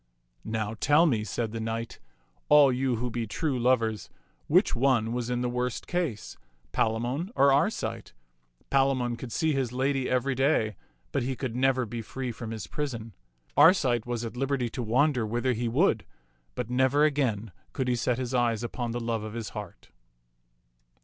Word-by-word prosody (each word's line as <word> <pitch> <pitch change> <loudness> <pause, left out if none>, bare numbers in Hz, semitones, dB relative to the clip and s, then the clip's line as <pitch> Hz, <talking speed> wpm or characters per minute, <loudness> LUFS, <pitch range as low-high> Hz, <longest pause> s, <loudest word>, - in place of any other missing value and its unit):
["Now 110 -1 -2
tell 145 +8 +4
me," 115 -9 +1
said 110 0 -3
the 115 - -4
knight, 115 +1 -4 0.5
"all 145 -2 +7
you 130 0 0
who 120 +2 -3
be 115 -1 -3
true 135 +4 -1
lovers, 115 -4 +1 0.4
which - - +3
one 120 -3 +2
was 120 -1 -2
in 125 0 -1
the 125 - 0
worse 125 0 -1
case, 120 - -3 0.3
Palamon 120 - 0
or 140 0 +5
Arcite? 115 - -1 0.6
Palamon 135 -3 +2
could 120 0 -8
see 160 +6 +1
his 135 -4 -1
lady 130 +1 0
every 130 +2 +1
day, 130 -5 +1 0.4
but 140 - 0
he 130 +2 -2
could 125 -3 -4
never 130 0 +2
be 115 +1 -5
free 125 +3 -5
from 115 0 -7
his 110 -4 -5
prison. 115 - -5 0.4
Arcite 125 - +5
was 120 -1 -2
at 115 - -6
liberty 135 -1 -1
to 125 - -5
wander 125 +3 +2
whither 120 +4 0
he 120 +1 -2
would, 115 - +2 0.5
but 125 -3 -3
never 130 +4 +3
again 120 -8 0 0.2
could 130 -2 -2
he 125 - +2
set 120 0 0
his 130 -1 -3
eyes 120 -2 +1
upon 120 0 -3
the 120 - -2
love 115 -2 -2
of 110 0 -6
his 115 -3 -4
heart." - - -9
125 Hz, 175 wpm, -28 LUFS, 115-135 Hz, 0.6 s, all